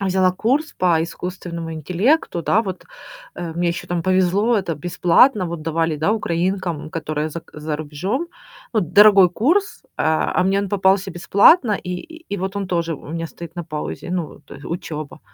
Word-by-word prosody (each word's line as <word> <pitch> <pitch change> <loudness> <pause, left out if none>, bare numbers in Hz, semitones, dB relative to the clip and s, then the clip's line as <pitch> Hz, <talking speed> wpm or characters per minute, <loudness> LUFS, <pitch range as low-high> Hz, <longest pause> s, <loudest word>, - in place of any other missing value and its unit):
а, 195 - -1
взяла 185 0 +3
курс 270 - 0
по 170 -3 +2
искусственному 170 -1 -6
интеллекту, 180 - 0
да, 220 - +3
вот, 190 -4 -6 0.5
а, 170 -2 -5
мне 175 0 0
еще 170 0 -4
там 175 -1 -2
повезло, 185 +5 +2
это 170 -4 -3
бесплатно, 180 - +3
вот, 165 -2 -5
давали, 165 0 0
да, 160 +8 +1
украинкам, 175 -5 -2
которые 155 -1 -3
зак 170 +1 -9
за 150 0 -4
рубежом. 180 - -3 0.5
Вот 190 -7 0
дорогой 200 -3 +7
курс, 340 - 0
а, 160 0 +1
а, - - +3
мне 195 +1 +2
он 200 - -2
попался 195 0 +2
бесплатно, 205 - +4
и 180 -2 -3
и 325 - -10
и - - -2
вот 190 +1 -4
он 200 - -2
тоже 170 -2 -1
у 145 - -12
меня 165 +1 -4
стоит 170 +1 -11
на 175 - -4
паузе, 155 +2 -5
ну 175 -3 -1
вот 145 - -16
тое 140 - -12
учёба. 155 -4 -6
180 Hz, 185 wpm, -21 LUFS, 165-200 Hz, 0.5 s, дорогой